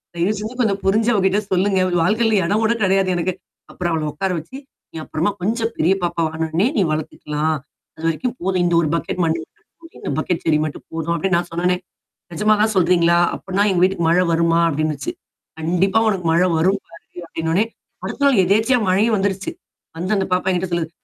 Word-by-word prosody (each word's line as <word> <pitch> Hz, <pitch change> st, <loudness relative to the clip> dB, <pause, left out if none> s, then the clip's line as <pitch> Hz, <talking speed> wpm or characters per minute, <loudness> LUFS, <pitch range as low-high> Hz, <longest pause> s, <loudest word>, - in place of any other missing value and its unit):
தயவு 175 Hz, +5 st, +1 dB
செஞ்சு 220 Hz, +4 st, -6 dB
கொஞ்சம் 200 Hz, -4 st, 0 dB
புரிஞ்சு 220 Hz, +4 st, +3 dB
அவகிட்ட 195 Hz, +1 st, +2 dB
சொல்லுங்க. 190 Hz, +1 st, +2 dB, 0.2 s
வாழ்க்கையில 220 Hz, +2 st, +2 dB
எடம் 210 Hz, +4 st, +1 dB
கூட 225 Hz, +1 st, +3 dB
கெடையாது 190 Hz, 0 st, +2 dB
எனக்கு. 180 Hz, +2 st, -1 dB, 0.4 s
அப்புறம் 175 Hz, -2 st, -2 dB
அவள 160 Hz, -1 st, -1 dB
உட்கார 190 Hz, +4 st, -2 dB
வச்சு, 170 Hz, +12 st, -10 dB, 0.4 s
நீ -, -, -7 dB
அப்புறமா 170 Hz, +6 st, -1 dB
கொஞ்சம் 225 Hz, +4 st, -1 dB
பெரிய 170 Hz, +5 st, +3 dB
பாப்பா 170 Hz, -1 st, -1 dB
வாண 160 Hz, 0 st, -9 dB
உடனே 165 Hz, +6 st, +1 dB
நீ -, -, +4 dB
வளர்த்துக்கலாம். 155 Hz, 0 st, -2 dB, 0.4 s
அதுவரைக்கும் 165 Hz, +10 st, -2 dB
போதும். 185 Hz, 0 st, 0 dB
இந்த 175 Hz, -, +1 dB
ஒரு 155 Hz, -, 0 dB
பக்கெட் 170 Hz, +3 st, -2 dB
மண்ணு 165 Hz, 0 st, +1 dB
மட்டும் 420 Hz, -, -23 dB
போதும் 330 Hz, -, -15 dB
இந்த -, -, -4 dB
பக்கெட் 165 Hz, +2 st, -1 dB
செடி 155 Hz, -2 st, +3 dB
மட்டும் 150 Hz, -, -7 dB
போதும் 165 Hz, +1 st, -2 dB
அப்படின்னு 180 Hz, +2 st, +1 dB
நான் 175 Hz, 0 st, -2 dB
சொன்ன 170 Hz, +1 st, -3 dB
உடனே. 180 Hz, 0 st, +2 dB, 0.6 s
நெஜமா 210 Hz, +6 st, +3 dB
தான் 215 Hz, 0 st, +2 dB
சொல்றீங்களா? 170 Hz, -2 st, +4 dB, 0.2 s
அப்டினா 195 Hz, +1 st, -1 dB
எங்க 180 Hz, -2 st, +1 dB
வீட்டுக்கு 185 Hz, -2 st, +1 dB
மழை 180 Hz, +2 st, +4 dB
வருமா? 165 Hz, 0 st, +2 dB
அப்படின்னுச்சு. 155 Hz, -2 st, -2 dB, 0.5 s
கண்டிப்பா 180 Hz, +6 st, +2 dB
உனக்கு 195 Hz, -5 st, -1 dB
மழை 175 Hz, +3 st, +3 dB
வரும் 190 Hz, +5 st, +2 dB
கண்டிப்பா 165 Hz, +1 st, -12 dB
அப்டின்னு 165 Hz, 0 st, -3 dB
சொன்ன -, -, +1 dB
வுடனே 200 Hz, +6 st, +3 dB, 0.4 s
அடுத்த 285 Hz, -, -4 dB
நாள் 265 Hz, -8 st, +5 dB
எதேச்சியா 220 Hz, +7 st, +3 dB
மழையும் 215 Hz, +5 st, +3 dB
வந்துருச்சு. 195 Hz, -, -1 dB, 0.5 s
வந்து 185 Hz, +6 st, -1 dB
அந்த 190 Hz, -, -1 dB
பாப்பா 185 Hz, +1 st, +1 dB
என்கிட்ட 180 Hz, 0 st, -1 dB
சொல்லுது. 165 Hz, -2 st, -1 dB
185 Hz, 195 wpm, -20 LUFS, 165-200 Hz, 0.6 s, நாள்